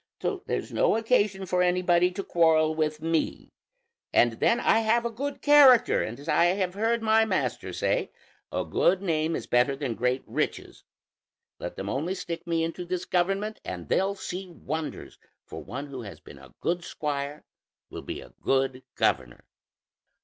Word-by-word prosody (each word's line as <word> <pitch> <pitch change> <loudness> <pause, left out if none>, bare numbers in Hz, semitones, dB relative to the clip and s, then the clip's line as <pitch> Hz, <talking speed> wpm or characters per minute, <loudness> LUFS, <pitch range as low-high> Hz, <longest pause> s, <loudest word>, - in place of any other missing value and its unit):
So - - -2
there's - - -3
no - - +3
occasion 210 -4 +1
for 180 0 +1
anybody 180 0 +3
to 195 - -4
quarrel 160 -3 +3
with 155 -1 -2
me; 165 -1 -1 0.6
and 120 - +4
then 235 - +3
I 225 - +3
have 230 +2 +2
a 235 - -1
good 280 +5 -5
character, 285 -5 +6
and 115 +4 -5
as 145 - -12
I 170 - +4
have 180 0 +1
heard 225 +3 0
my 220 0 +4
master 220 - -2
say, - - -1 0.4
'A - - -2
good 190 +1 +2
name 160 -2 0
is - - -4
better 125 +3 +2
than 135 -4 -3
great 125 +3 -1
riches'; - - -3 0.8
let - - -6
them 95 - -6
only 155 - -2
stick 170 -2 -6
me 165 -1 +1
into 165 +2 -3
this 180 +1 -3
government 195 +4 0
and 90 -2 -7
they'll 195 +1 +1
see 190 -1 -6
wonders, 160 -2 -6 0.3
for - - -8
one 135 +4 -6
who 135 -3 -7
has 100 -4 -9
been 70 - -14
a 65 -2 -16
good 175 +1 -1
squire 145 -1 -4 0.5
will - - -6
be - - -6
a - - -15
good 135 -1 +1
governor." 65 -2 0
175 Hz, 170 wpm, -27 LUFS, 140-195 Hz, 0.8 s, character